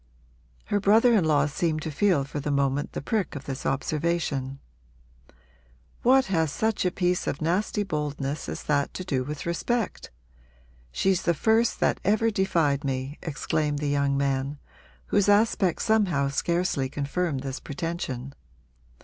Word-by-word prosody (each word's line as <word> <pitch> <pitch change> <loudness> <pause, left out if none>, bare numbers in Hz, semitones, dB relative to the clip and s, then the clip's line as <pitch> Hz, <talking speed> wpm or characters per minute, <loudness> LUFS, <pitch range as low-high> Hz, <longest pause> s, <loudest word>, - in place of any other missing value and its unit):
Her 205 - 0
brother 220 +5 +5
in 200 -7 +3
law 145 -2 +3
seemed 155 +1 -1
to 160 - -3
feel 175 -2 +2
for 145 +2 -5
the 145 - -3
moment 140 0 0
the - - -5
prick 210 +1 -1
of 140 - -7
this 135 -1 -4
observation. 140 -2 -1 1.4
'What 265 +2 +5
has 160 -5 0
such 220 +4 0
a 180 - +2
piece 180 0 0
of 140 - -2
nasty 185 +6 0
boldness 150 -4 -3
as - - -5
that 145 -2 0
to 185 - -4
do 135 -8 -1
with 145 +2 -6
respect? 215 +6 -2 0.8
She's 190 - +1
the 170 - +1
first 225 +7 +2
that - - +2
ever 220 +3 +2
defied 165 -8 +1
me!' 135 +1 -3
exclaimed 150 -1 -1
the 145 0 -1
young 140 -1 +1
man, 140 +1 -1 0.6
whose 205 0 +4
aspect 205 -3 +3
somehow 180 -11 +2
scarcely 170 -2 0
confirmed 145 +1 -2
this 135 0 -5
pretension. 140 -4 -4
155 Hz, 150 wpm, -26 LUFS, 140-190 Hz, 1.4 s, brother